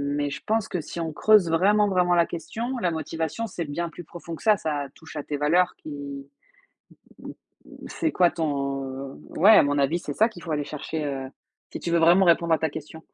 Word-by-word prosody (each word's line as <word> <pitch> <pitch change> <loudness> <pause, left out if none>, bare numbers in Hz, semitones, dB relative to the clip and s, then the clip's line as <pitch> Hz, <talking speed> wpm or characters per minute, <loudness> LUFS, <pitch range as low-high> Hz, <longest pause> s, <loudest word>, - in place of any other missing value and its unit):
mais 145 0 -1
je - - -6
pense 220 -1 0
que 180 - -3
si 170 - -8
on 165 -1 -2
creuse 210 -1 +4
vraiment, 205 +5 +3
vraiment 180 -1 +2
la 170 -1 +3
question, 230 +10 -5
la 175 -5 0
motivation, 160 +7 -3
c'est 175 -4 -5
bien 170 +4 -3
plus 175 - -10
profond 170 +1 -9
que - - -14
ça. 215 -1 +5
Ça 145 -4 -3
touche 160 -1 -13
à 150 - -4
tes 145 - -4
valeurs 170 +5 +2
qui - - -10 1.3
mmh, - - -8 0.6
c'est 320 - -2
quoi 175 -1 +4
ton 140 -4 -3 0.3
ouais 200 +6 +7
à - - +8
mon 145 0 0
avis, 140 +5 +2
c'est - - -5
ça 220 +2 +4
qu'il 180 -7 -13
faut 165 - -7
aller 150 -1 -1
chercher, 150 +1 -5
heu, 135 -2 -4 0.4
si - - -5
tu 170 - -3
veux 170 - +4
vraiment 175 +4 +6
répondre 170 -1 +3
à - - 0
ta 160 - 0
question. 160 +1 -9
165 Hz, 220 wpm, -25 LUFS, 150-180 Hz, 1.3 s, à